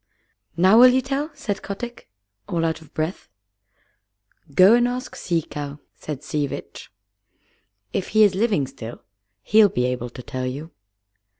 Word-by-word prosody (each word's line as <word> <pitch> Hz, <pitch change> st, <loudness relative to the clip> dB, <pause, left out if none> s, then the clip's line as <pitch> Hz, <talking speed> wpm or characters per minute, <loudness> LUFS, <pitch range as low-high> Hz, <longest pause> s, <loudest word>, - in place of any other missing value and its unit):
"Now 190 Hz, +6 st, +6 dB
will 250 Hz, -, +10 dB
you 255 Hz, +1 st, +4 dB
tell?" 275 Hz, +3 st, -2 dB
said 205 Hz, -7 st, -4 dB
Kotick, 235 Hz, -, -7 dB, 0.4 s
all 165 Hz, -1 st, 0 dB
out 160 Hz, 0 st, -2 dB
of 160 Hz, -, -17 dB
breath. 160 Hz, -, -4 dB, 1.2 s
"Go 185 Hz, +9 st, +7 dB
and 240 Hz, 0 st, +4 dB
ask 250 Hz, +1 st, -5 dB
Sea 170 Hz, -3 st, -1 dB
Cow," 145 Hz, -1 st, -6 dB, 0.2 s
said 150 Hz, -2 st, -7 dB
Sea 150 Hz, -1 st, -1 dB
Vitch. -, -, -9 dB, 1.0 s
"If 190 Hz, -, -2 dB
he 215 Hz, 0 st, +4 dB
is 205 Hz, -2 st, +5 dB
living 200 Hz, -, +1 dB
still, 120 Hz, -4 st, -9 dB, 0.4 s
he'll 215 Hz, -1 st, +5 dB
be 125 Hz, -7 st, 0 dB
able 125 Hz, -1 st, -2 dB
to 125 Hz, +1 st, -10 dB
tell 130 Hz, +1 st, -4 dB
you." 145 Hz, +6 st, -6 dB
175 Hz, 155 wpm, -23 LUFS, 140-220 Hz, 1.2 s, will